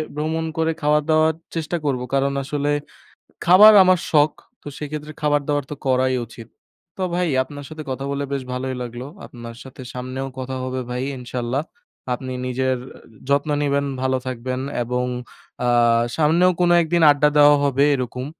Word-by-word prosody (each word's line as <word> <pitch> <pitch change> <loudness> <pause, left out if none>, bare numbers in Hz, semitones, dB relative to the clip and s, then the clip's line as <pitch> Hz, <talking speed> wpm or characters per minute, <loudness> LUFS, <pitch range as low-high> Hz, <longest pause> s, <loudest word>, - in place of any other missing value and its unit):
ভ্রমণ 160 +2 -2
করে 160 0 +1
খাওয়া 150 +1 +3
দাওয়ার 155 0 +3 0.2
চেষ্টা 165 +1 -2
করব। 130 -3 0
কারণ 140 0 +1
আসলে 145 +1 -1 0.7
খাবার 195 +5 +9
আমার 185 -1 +4
শখ। 150 -1 +4 0.3
তো - - -12
সেক্ষেত্রে 150 0 -6
খাবার 145 -1 +2
দাবার 145 -1 0
তো - - -3
করাই 130 0 +2
উচিত। 115 0 -12 0.5
তো 190 - -2
ভাই 180 0 +1 0.2
আপনার 145 0 -10
সাথে 155 0 -8
কথা 135 +1 -4
বলে 140 0 -2
বেশ 135 -2 -2
ভালোই 130 +1 -3
লাগলো। 120 +1 -6 0.2
আপনার 115 -1 -10
সাথে 130 0 -12
সামনেও 130 +1 -5
কথা 130 0 -4
হবে 130 0 -3
ভাই, 125 +1 -3
ইনশাল্লাহ। 125 +2 -3 0.5
আপনি 130 +1 -5
নিজের 130 +1 0 0.5
যত্ন 140 +2 +1
নিবেন, 140 -1 +1 0.2
ভালো 130 0 +1
থাকবেন 130 0 -3 0.2
এবং 125 +1 -1 0.6
আ - - +1 0.5
সামনেও 165 +4 +4
কোন 175 -1 +3
একদিন 170 +1 +1
আড্ডা 145 +1 +3
দেওয়া 145 0 +7
হবে 140 0 +2
এরকম। 125 0 -4
140 Hz, 160 wpm, -21 LUFS, 130-150 Hz, 0.7 s, খাবার